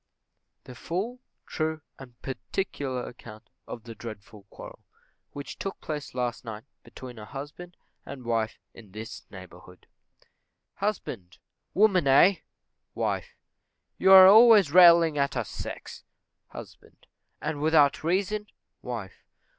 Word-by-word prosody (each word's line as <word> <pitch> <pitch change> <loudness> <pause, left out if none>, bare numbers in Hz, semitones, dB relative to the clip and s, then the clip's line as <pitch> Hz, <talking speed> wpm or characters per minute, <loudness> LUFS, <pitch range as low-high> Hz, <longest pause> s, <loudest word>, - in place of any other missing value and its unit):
THE 125 - -11
FULL, 195 - -4 0.3
TRUE, 160 0 -3 0.2
AND 125 -3 -14
PARTICULAR 135 -2 -4
ACCOUNT 110 -2 -13 0.2
OF 115 - -8
THE 115 - -9
DREADFUL 110 -2 -11
QUARREL - - -12 0.5
Which 140 0 -8
took 195 - -5
place 150 -4 -6
Last 120 -3 -3
Night 110 -2 -8 0.2
between 125 -3 -11
a 105 - -9
Husband 145 +8 -10 0.3
and 130 -3 -10
Wife 115 -1 -1 0.2
in 105 -5 -16
this 110 +1 -9
Neighbourhood. 90 -1 -14 0.9
Husband. 125 - -4 0.4
Woman 190 -6 +3
aye! 170 +8 +5 0.5
Wife. - - -3 0.6
You 190 - +4
are 190 -1 +11
always 215 -5 +7
railing 170 -3 +6
at 140 -2 0
our 120 - -2
sex. - - -8 0.4
Husband. - - -13 0.3
And 145 -2 -4
without 155 -2 +3
reason? 200 +5 -1 0.4
_Wife. 115 -7 -7
140 Hz, 120 wpm, -26 LUFS, 115-175 Hz, 0.9 s, are